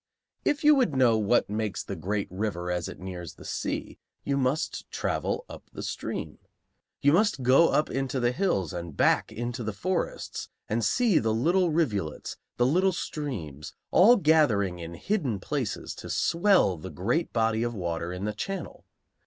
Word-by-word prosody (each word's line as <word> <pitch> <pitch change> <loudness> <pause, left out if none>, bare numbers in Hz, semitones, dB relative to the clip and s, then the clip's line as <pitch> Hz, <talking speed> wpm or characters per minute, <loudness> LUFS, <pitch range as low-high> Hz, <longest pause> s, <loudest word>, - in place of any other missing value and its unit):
If 295 +1 0
you 300 0 +8
would 255 - +2
know 125 -3 +5
what 110 +3 +2
makes 105 -1 -2
the - - -5
great 100 +5 -2
river 95 -3 -2
as 90 -1 -2
it - - -9
nears 90 -2 -7
the - - -13
sea, - - -4 0.2
you 140 - 0
must 140 +3 -1
travel - - -2
up - - -12
the - - -6
stream. - - -5 0.6
You 145 +1 +5
must 190 - +2
go 135 +7 +6
up 150 - +2
into 135 -1 -1
the 120 0 +2
hills 125 - 0
and 85 -4 -6
back - - +3
into 120 +1 -4
the 110 -1 -3
forests 185 - -3 0.2
and 115 +2 -1
see 230 - +3
the 110 -1 0
little 175 +9 +2
rivulets, 110 - -1 0.2
the 120 - +3
little 185 +8 +3
streams, 105 - -5 0.2
all 225 +7 +7
gathering 135 - +3
in 85 0 -7
hidden 140 - -1
places 135 -2 -3
to - - -8
swell 170 - +3
the 95 +4 -8
great 120 - -1
body 110 -1 +1
of 120 0 -1
water 85 -2 -3
in 90 +2 -4
the 105 - -1
channel. 195 - -5
120 Hz, 170 wpm, -27 LUFS, 95-160 Hz, 0.6 s, you